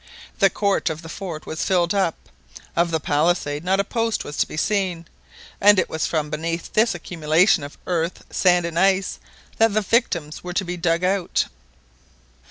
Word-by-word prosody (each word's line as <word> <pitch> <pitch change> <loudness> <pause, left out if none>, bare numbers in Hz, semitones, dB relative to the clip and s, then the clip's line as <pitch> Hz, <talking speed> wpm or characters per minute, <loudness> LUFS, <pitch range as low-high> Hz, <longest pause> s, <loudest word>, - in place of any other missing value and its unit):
The 195 -2 +6
court 200 0 0
of 160 +1 -5
the 165 - -9
fort 170 -4 -6
was 160 - -4
filled 175 -2 +2
up, 190 -5 +1 0.6
of 170 0 +2
the 160 -1 0
palisade 150 0 0
not 190 +2 +1
a - - +3
post 230 +2 -1
was 145 - -7
to - - +2
be - - -8
seen, 185 -3 0 0.6
and 205 0 +7
it 185 - +1
was 160 - -1
from 150 -2 -2
beneath 165 +2 -3
this 220 -2 +3
accumulation 165 0 +2
of 145 - -9
earth, 170 -1 -2
sand, 180 -2 +3
and 170 0 -2
ice, 195 0 +2 0.4
that 225 -2 +4
the 215 - +3
victims 180 -9 0
were 180 0 -5
to 190 +2 0
be 175 +1 -4
dug 170 0 0
out. 185 -1 +1
175 Hz, 180 wpm, -22 LUFS, 160-195 Hz, 0.6 s, and